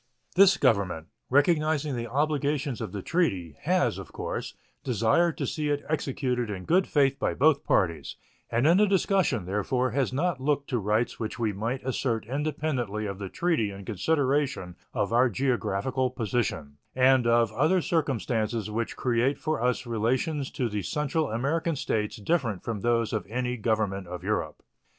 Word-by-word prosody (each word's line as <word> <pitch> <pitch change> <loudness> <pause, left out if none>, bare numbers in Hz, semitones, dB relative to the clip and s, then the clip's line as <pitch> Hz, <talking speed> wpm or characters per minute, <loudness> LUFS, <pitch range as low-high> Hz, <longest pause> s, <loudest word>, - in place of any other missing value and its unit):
This 195 +1 +6
Government, 90 -6 +1 0.2
recognizing 150 0 +2
the 120 -1 -3
obligations 145 -1 0
of - - -4
the 100 -2 -5
treaty, 95 - 0
has, - - +1
of - - -9
course, - - -5 0.3
desired 125 - +2
to - - -2
see 150 -1 -2
it 145 0 -1
executed 130 -5 -1
in 95 -3 -5
good 185 +3 +3
faith 135 -2 +2
by - - 0
both 145 0 +3
parties, 85 -7 0 0.3
and 120 +4 +1
in 170 +4 +6
the 210 +1 +5
discussion, 190 - +1
therefore, 120 +6 0
has 135 +1 0
not 145 +1 -1
looked 140 0 0
to 125 - +1
rights 105 +3 0
which 110 0 -4
we 110 -3 0
might 115 +6 -3
assert 120 -4 -1
independently 135 -5 -2
of 100 -1 -5
the 100 -2 -5
treaty 165 - 0
in 100 0 -9
consideration 135 - 0 0.2
of 105 +2 -1
our 125 +2 +5
geographical 125 +1 0
position 105 - -2 0.2
and 130 -1 +4
of 115 0 +3
other 160 +7 +2
circumstances 120 - -1
which 115 +2 -2
create 125 +2 +1
for 155 -5 -2
us 125 +1 0
relations 130 +6 -1
to 125 - -2
the 105 -2 -3
Central 150 - -1
American 150 +8 0
States 105 -5 -1
different 115 - -1
from 110 -4 -3
those 115 -1 +1
of - - -1
any 125 +3 -2
government 105 -4 -1
of 90 0 -7
Europe. - - -2
125 Hz, 165 wpm, -27 LUFS, 110-145 Hz, 0.3 s, This